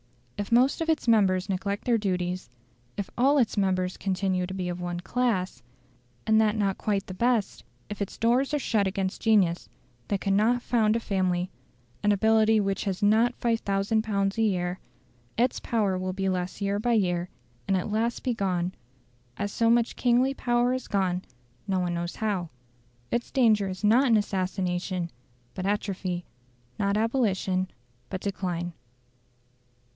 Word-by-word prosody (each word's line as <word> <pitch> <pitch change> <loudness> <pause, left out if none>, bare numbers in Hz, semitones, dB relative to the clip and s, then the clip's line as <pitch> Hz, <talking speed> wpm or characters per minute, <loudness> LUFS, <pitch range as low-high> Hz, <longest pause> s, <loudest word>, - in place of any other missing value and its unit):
If 205 +1 -5
most 255 +6 +4
of 325 - -1
its 315 -5 0
members 195 -5 +3
neglect 200 +1 -2
their 235 -2 +3
duties, 180 - -2 0.5
if 200 - -4
all 275 +4 +4
its 245 -5 +2
members 185 -2 0
continue 185 -1 -1
to 190 - -6
be 185 -2 -3
of 175 0 -4
one 175 0 -3
class, 190 - -1 0.6
and 220 0 +4
that 215 0 +2
not 195 -2 0
quite 200 -2 -1
the 185 - -7
best; 235 +1 0 0.2
if 210 0 -7
its 200 - -4
doors 245 +5 +2
are 300 - +1
shut 215 -7 +1
against 190 -1 -2
genius 195 -6 +2 0.4
that 200 - 0
cannot 215 +6 +2
found 220 -3 +2
a - - +1
family, 185 -4 -1 0.5
and 210 - +3
ability 220 +1 +4
which 195 -1 -1
has 195 +1 -2
not 225 +4 +4
5000 220 -2 0
pounds 200 -1 -1
a - - +3
year, 180 -4 0 0.6
its 245 +2 +2
power 210 -5 0
will 185 0 -2
be 195 0 -2
less 185 0 -2
year 200 0 0
by 240 +2 +1
year, 180 -5 +1 0.4
and 195 -1 +2
at 185 +3 -3
last 230 +3 -1
be 250 - 0
gone, 185 -4 -1 0.6
as 205 0 -2
so 230 +2 +2
much 235 0 +2
kingly 250 +2 +2
power 245 -1 +1
is 255 - -4
gone 185 -3 0 0.5
no 190 -2 +1
one 175 -1 -1
knows 170 0 -3
how. 200 -6 -2 0.6
Its 240 - -1
danger 220 -6 +3
is 185 +2 -7
not 235 +6 +5
in 230 -3 +5
assassination, 185 -3 -2 0.4
but 185 0 -3
atrophy; 190 -3 -2 0.5
not 200 0 +1
abolition, 200 -5 0 0.4
but 190 - -4
decline. 175 -3 -3
200 Hz, 160 wpm, -27 LUFS, 185-225 Hz, 0.6 s, not